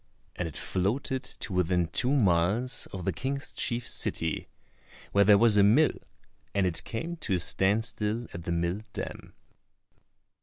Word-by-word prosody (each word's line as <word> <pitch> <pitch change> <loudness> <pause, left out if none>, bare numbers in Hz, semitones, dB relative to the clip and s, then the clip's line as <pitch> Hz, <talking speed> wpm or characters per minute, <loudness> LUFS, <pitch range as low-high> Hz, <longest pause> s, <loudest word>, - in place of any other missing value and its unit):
And 90 - -2
it 80 - -9
floated 125 +8 -1
to 105 - -4
within 90 -1 +2
two 125 +10 0
miles 105 0 +2
of 95 -3 -7
the 95 - 0
King's 135 - -3
chief 120 -4 -1
city, 80 -1 -1 0.6
where 100 +3 +5
there 100 0 +7
was 115 -1 +5
a 100 - +7
mill, 125 +9 +5 0.6
and 100 -1 +3
it 90 -3 -1
came 165 +10 -4
to 110 -11 -2
a - - +3
stand 100 +5 +1
still 110 +1 -2
at 85 -1 -7
the - - -2
mill 85 +3 0
dam. - - -6
100 Hz, 160 wpm, -28 LUFS, 90-120 Hz, 0.6 s, there